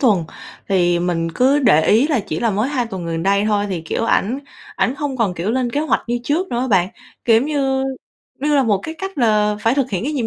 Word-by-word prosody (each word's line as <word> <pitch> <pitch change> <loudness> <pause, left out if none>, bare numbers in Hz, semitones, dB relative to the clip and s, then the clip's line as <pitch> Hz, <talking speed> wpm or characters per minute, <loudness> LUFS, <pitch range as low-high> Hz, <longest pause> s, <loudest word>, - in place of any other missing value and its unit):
tuần. 210 - +3 0.4
Thì 175 -3 +2
mình 170 -1 -1
cứ 265 - +3
để 160 - +4
ý 235 +8 +4
là 285 -8 +1
chỉ 160 -4 -5
là 230 - +1
mới 215 +6 0
2 255 -5 -1
tuần 190 -6 -6
gần 165 0 -3
đây 200 +2 +2
thôi 205 -1 +1
thì, 175 - -2
kiểu, 160 +8 -3
ảnh 230 +2 +1 0.4
ảnh 250 - +1
hông 290 -2 -3
còn, 210 -7 0
kiểu, 175 +5 -2
lên 245 0 0
kế 285 - -1
hoạch 310 - 0
như 240 0 -1
trước 330 +8 0
nữa 240 - -2
á 260 - -1
bạn. 185 -4 +3 0.4
Kiểu 230 -2 +5
giống 245 +6 +1
như 270 -3 0 0.6
như 295 +2 0
là 275 - +4
một 210 -5 +2
cái 320 - -6
cách 385 -5 -6
là 210 -3 +2
phải 230 +3 +2
thực 270 -3 0
hiện 195 +3 -2
cái 300 - -2
nhiệm 250 -6 -1
230 Hz, 255 wpm, -19 LUFS, 195-270 Hz, 0.6 s, Kiểu